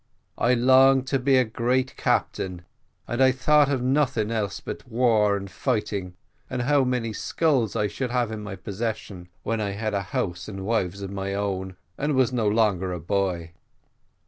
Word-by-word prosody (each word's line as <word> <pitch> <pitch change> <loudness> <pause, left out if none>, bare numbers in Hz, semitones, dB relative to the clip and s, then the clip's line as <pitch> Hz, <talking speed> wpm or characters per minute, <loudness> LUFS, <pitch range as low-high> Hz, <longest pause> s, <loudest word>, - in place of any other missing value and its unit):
I 125 +2 +3
longed 130 +2 +5
to 135 - +1
be 135 +1 +3
a 130 - +5
great 125 +3 0
captain, 90 -2 -1 0.4
and 120 +2 -1
I 130 0 +6
thought 145 +3 +3
of 130 -3 0
nothing 130 -5 +1
else 105 -4 -2
but - - -7
war 110 -4 +3
and 100 0 -6
fighting, 95 0 -2 0.3
and 125 -1 -2
how 140 +1 +3
many 125 -3 -1
skulls 130 -5 0
I 105 - +1
should 120 +5 -3
have 120 -2 0
in 110 -1 -5
my 105 -2 -6
possession 100 -2 -5
when 115 0 -1
I 100 -1 -2
had 110 +1 -3
a 100 - 0
house 85 -2 -3
and 95 -2 -6
wives 100 -3 -1
of 95 - -5
my 100 0 -3
own, 95 -2 -3 0.2
and 150 +2 0
I - - 0
was 130 -1 +2
no 115 -4 +1
longer 105 -4 +2
a 90 - -4
boy. 90 -2 -1
110 Hz, 185 wpm, -25 LUFS, 100-130 Hz, 0.4 s, I